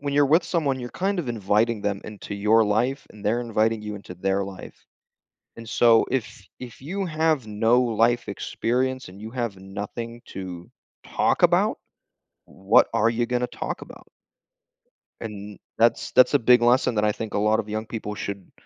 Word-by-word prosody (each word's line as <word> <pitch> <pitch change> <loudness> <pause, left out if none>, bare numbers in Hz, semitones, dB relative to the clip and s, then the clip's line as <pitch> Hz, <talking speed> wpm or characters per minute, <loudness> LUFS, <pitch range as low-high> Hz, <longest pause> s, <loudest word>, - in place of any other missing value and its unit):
when 140 0 -3
you're 145 0 +4
with 160 +6 +4
someone, 145 -6 0
you're 120 0 -6
kind 195 +1 -1
of 160 -7 -3
inviting 110 0 +1
them 100 -1 -1
into 105 -1 -8
your 110 +2 +3
life, 120 +7 0
and 105 - -14
they're 115 +4 +1
inviting 115 -1 0
you 105 -1 -5
into 95 -2 -10
their 95 +2 -1
life, 95 -1 -11 0.7
and 115 - -10
so, 115 0 +5
if 130 -5 0 0.3
if 125 -2 -10
you 190 +7 -3
have 155 -6 0
no 115 +3 +2
life 120 0 +1
experience 130 0 -2
and 95 +2 -13
you 110 - -7
have 120 -4 -3
nothing 105 +5 -7
to 90 -2 -8 0.4
talk - - 0
about, - - +3 0.7
what 95 +3 +3
are 115 0 +3
you 120 +1 0
gonna 125 0 0
talk - - -5
about? - - -13 1.1
And 105 -2 -7 0.2
that's 115 +1 +2
that's 130 +3 +5
a 145 - +5
big 125 +1 +5
lesson 125 0 +3
that 105 0 +2
I 105 - +3
think 110 0 -6
a - - 0
lot 110 +1 +2
of 110 - -2
the 105 - -9
young 110 +1 -3
people 110 -2 -5
should 100 -2 -6
115 Hz, 185 wpm, -24 LUFS, 105-125 Hz, 1.1 s, so